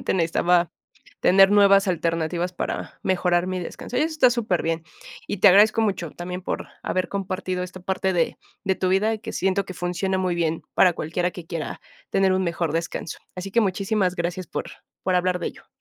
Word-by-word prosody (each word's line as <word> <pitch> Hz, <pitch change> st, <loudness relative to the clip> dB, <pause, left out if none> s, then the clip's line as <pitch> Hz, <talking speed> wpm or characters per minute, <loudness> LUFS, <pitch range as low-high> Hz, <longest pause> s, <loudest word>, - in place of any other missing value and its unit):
solamente -, -, -1 dB
necesitaba 175 Hz, 0 st, +2 dB, 0.5 s
tener 195 Hz, +1 st, +6 dB
nuevas 200 Hz, -1 st, +6 dB
alternativas 170 Hz, 0 st, -1 dB
para -, -, -4 dB
mejorar 180 Hz, -1 st, +1 dB
mi 185 Hz, -1 st, -2 dB
descanso". 245 Hz, +7 st, -5 dB
Y -, -, +2 dB
eso 315 Hz, +1 st, +1 dB
está 260 Hz, -5 st, +5 dB
súper 220 Hz, -7 st, 0 dB
bien. 165 Hz, 0 st, -1 dB, 0.4 s
Y -, -, -3 dB
te 200 Hz, -, +7 dB
agradezco 215 Hz, +4 st, +6 dB
mucho 185 Hz, -7 st, -1 dB
también 180 Hz, +1 st, -6 dB
por -, -, -4 dB
haber 185 Hz, -1 st, -1 dB
compartido 185 Hz, -2 st, -3 dB
esta 180 Hz, 0 st, -7 dB
parte 190 Hz, +1 st, -1 dB
de, 170 Hz, -2 st, 0 dB, 0.3 s
de 190 Hz, -1 st, +2 dB
tu 185 Hz, -, -1 dB
vida 200 Hz, +4 st, +2 dB
y 220 Hz, -, -3 dB
que 225 Hz, -, -7 dB
siento 195 Hz, +1 st, 0 dB
que 185 Hz, -, -7 dB
funciona 180 Hz, +2 st, -1 dB
muy 185 Hz, -2 st, 0 dB
bien 165 Hz, -1 st, -1 dB
para 180 Hz, -3 st, +5 dB
cualquiera 175 Hz, +3 st, -1 dB
que 175 Hz, -2 st, -10 dB
quiera 165 Hz, -3 st, -5 dB, 0.3 s
tener 195 Hz, -1 st, +3 dB
un 190 Hz, 0 st, +1 dB
mejor 170 Hz, -3 st, -1 dB
descanso. 165 Hz, -1 st, -3 dB, 0.2 s
Así 185 Hz, +2 st, -6 dB
que 235 Hz, +4 st, +3 dB
muchísimas 195 Hz, -1 st, 0 dB
gracias 175 Hz, +1 st, -3 dB
por, -, -, -4 dB, 0.4 s
por 185 Hz, -, 0 dB
hablar 180 Hz, 0 st, +2 dB
de -, -, -1 dB
ello. -, -, -14 dB
185 Hz, 195 wpm, -24 LUFS, 175-195 Hz, 0.5 s, te